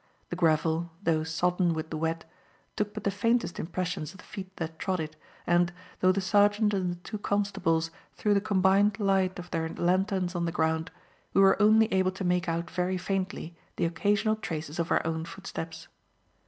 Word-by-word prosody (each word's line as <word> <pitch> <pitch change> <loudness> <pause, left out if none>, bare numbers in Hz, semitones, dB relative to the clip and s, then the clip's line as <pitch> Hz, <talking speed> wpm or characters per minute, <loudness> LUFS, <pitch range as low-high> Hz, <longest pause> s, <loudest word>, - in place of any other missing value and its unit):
The - - -1
gravel, 165 0 +2
though 160 -3 +2
sodden 175 +2 +1
with 160 0 -5
the 160 - -2
wet, 165 +1 -2 0.5
took 210 -1 -1
but - - -5
the 200 - +1
faintest 230 0 0
impressions 175 -1 -3
of - - -14
the - - -14
feet 190 -1 -8
that 160 -1 -5
trod 185 -2 -1
it, 155 -1 -4 0.3
and, 175 0 +3 0.3
though 185 - +5
the 190 - 0
sergeant 205 +2 +3
and 185 -3 0
the - - -4
two 205 +5 -7
constables 180 -6 0 0.2
threw 210 - +2
the 200 - +3
combined 200 +1 +3
light 195 -2 +2
of 180 -1 -8
their 160 -1 -1
lanterns 185 +1 0
on 175 -1 -1
the 165 - -1
ground, 160 +1 0 0.5
we 195 - +6
were 195 +2 +5
only 215 +1 +6
able 185 0 +3
to 190 - -5
make 180 -1 +1
out 170 +1 -2
very 185 +1 0
faintly 185 -2 -3 0.2
the - - 0
occasional 205 +6 +1
traces 160 -5 -5
of 170 +1 0
our - - +2
own 160 0 -1
footsteps. 170 -2 -7
180 Hz, 190 wpm, -28 LUFS, 165-195 Hz, 0.5 s, we